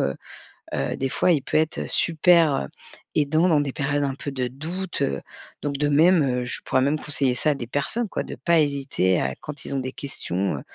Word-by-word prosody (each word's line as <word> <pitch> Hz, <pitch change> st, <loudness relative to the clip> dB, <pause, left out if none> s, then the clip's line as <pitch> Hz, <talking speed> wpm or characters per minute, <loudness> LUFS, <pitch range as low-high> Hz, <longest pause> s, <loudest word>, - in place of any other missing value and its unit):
heu, 70 Hz, -, 0 dB, 0.6 s
heu, -, -, -1 dB
des 135 Hz, 0 st, -1 dB
fois, 180 Hz, -, +2 dB
il 150 Hz, -5 st, +3 dB
peut 135 Hz, -, 0 dB
être 160 Hz, +1 st, 0 dB
super, 165 Hz, -2 st, +4 dB
heu, -, -, -9 dB, 0.5 s
aidant 155 Hz, +4 st, +3 dB
dans 150 Hz, -3 st, +4 dB
des 140 Hz, -2 st, -3 dB
périodes 145 Hz, +1 st, 0 dB
un 135 Hz, -1 st, -1 dB
peu 145 Hz, -, -5 dB
de 130 Hz, -2 st, -2 dB
doute, 170 Hz, +8 st, -5 dB
heu, 70 Hz, 0 st, 0 dB, 0.4 s
donc 140 Hz, -1 st, -2 dB
de 145 Hz, 0 st, +1 dB
même, 160 Hz, +2 st, +5 dB, 0.2 s
heu, -, -, -4 dB
je 125 Hz, -, -5 dB
pourrais 130 Hz, -, +1 dB
même 150 Hz, +3 st, +1 dB
conseiller 140 Hz, -3 st, 0 dB
ça 150 Hz, +4 st, +2 dB
à -, -, -1 dB
des 125 Hz, -4 st, -5 dB
personnes, 205 Hz, -, -1 dB
quoi. -, -, -2 dB
De -, -, -7 dB
pas 170 Hz, -2 st, +2 dB
hésiter 135 Hz, -, +1 dB
à 65 Hz, -, -1 dB
quand 145 Hz, -2 st, -7 dB
ils -, -, -4 dB
ont 135 Hz, -, 0 dB
des 130 Hz, 0 st, -4 dB
questions, 100 Hz, -8 st, -3 dB
145 Hz, 225 wpm, -24 LUFS, 135-155 Hz, 0.6 s, même